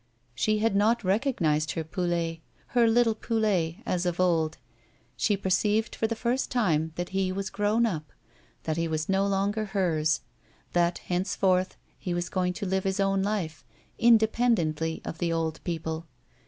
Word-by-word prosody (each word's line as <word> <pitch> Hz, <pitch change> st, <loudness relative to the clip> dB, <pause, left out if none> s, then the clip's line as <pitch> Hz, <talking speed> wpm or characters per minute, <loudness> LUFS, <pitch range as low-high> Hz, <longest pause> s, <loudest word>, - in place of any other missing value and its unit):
She 215 Hz, -, +1 dB
had 215 Hz, -1 st, +1 dB
not 220 Hz, +4 st, +3 dB
recognised 185 Hz, -, +1 dB
her 165 Hz, -, -2 dB
Poulet, 170 Hz, 0 st, -2 dB, 0.3 s
her 240 Hz, -2 st, +4 dB
little 230 Hz, 0 st, +4 dB
Poulet, 210 Hz, -7 st, 0 dB
as 180 Hz, 0 st, 0 dB
of 175 Hz, 0 st, -2 dB
old; 165 Hz, -3 st, +2 dB, 0.6 s
she 205 Hz, -, +1 dB
perceived 205 Hz, +3 st, +1 dB
for 225 Hz, -, 0 dB
the 230 Hz, -, -2 dB
first 245 Hz, +3 st, -1 dB
time 160 Hz, -10 st, +1 dB
that 175 Hz, 0 st, -3 dB
he 190 Hz, -1 st, 0 dB
was 195 Hz, 0 st, -3 dB
grown 210 Hz, +3 st, +2 dB
up, 160 Hz, -9 st, -3 dB, 0.5 s
that 155 Hz, 0 st, -2 dB
he 165 Hz, 0 st, 0 dB
was 155 Hz, -1 st, -2 dB
no 195 Hz, +1 st, +2 dB
longer 200 Hz, +2 st, 0 dB
hers, 165 Hz, -7 st, +1 dB, 0.5 s
that 175 Hz, 0 st, +2 dB
henceforth 185 Hz, 0 st, 0 dB, 0.2 s
he 175 Hz, -2 st, -3 dB
was 175 Hz, +1 st, -2 dB
going 180 Hz, -1 st, 0 dB
to 200 Hz, -, -5 dB
live 190 Hz, 0 st, 0 dB
his 195 Hz, +1 st, -1 dB
own 195 Hz, 0 st, +2 dB
life, 185 Hz, -7 st, -2 dB, 0.4 s
independently 220 Hz, -9 st, +3 dB
of 165 Hz, -, -6 dB
the 170 Hz, -1 st, 0 dB
old 165 Hz, -1 st, -2 dB
people. 160 Hz, -1 st, -4 dB
185 Hz, 160 wpm, -27 LUFS, 165-210 Hz, 0.6 s, her